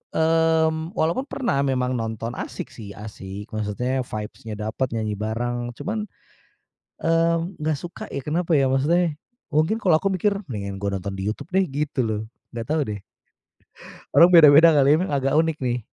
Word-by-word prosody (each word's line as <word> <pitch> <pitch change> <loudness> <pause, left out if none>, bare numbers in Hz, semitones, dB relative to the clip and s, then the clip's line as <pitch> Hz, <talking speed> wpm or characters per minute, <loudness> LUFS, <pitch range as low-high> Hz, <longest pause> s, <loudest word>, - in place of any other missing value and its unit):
mmm, 160 +1 +2
walaupun 170 +12 0
pernah 240 - -1
memang 130 -2 0
nonton, 115 0 -4
asyik - - -6
sih, 100 -4 -10
asyik 100 -1 -9
maksudnya 110 +5 -2
vibes-nya 110 +1 -6
dapat, 110 +5 -1
nyanyi 110 -1 -2
bareng, 120 +2 -3
cuman, 215 - -4 0.9
eee, 165 0 +2 0.2
nggak 155 0 0
suka 175 0 -8
ya, 140 - -3
kenapa 165 +5 -1
ya, 140 -4 +4
maksudnya, 155 +5 +2 0.3
mungkin 155 +7 +2
kalau 180 -6 +4
aku 195 +5 0
mikir, 195 +3 +1 0.2
mendingan 100 -5 -5
gue 100 +1 -3
nonton 95 +1 -4
di 95 - -4
YouTube 110 - -5
deh 190 - +4
gitu 145 0 -2
loh, 110 -2 -1 0.3
nggak 115 -1 -5
tahu 155 +1 +1 0.2
deh. - - -10 1.2
Orang 170 - +9
beda-beda 155 +1 +8
kali 140 -2 +4
ya, - - +7
emang 185 - -2
agak 135 0 0
unik 160 -1 +1
nih, 125 -1 0
140 Hz, 165 wpm, -23 LUFS, 110-165 Hz, 1.2 s, Orang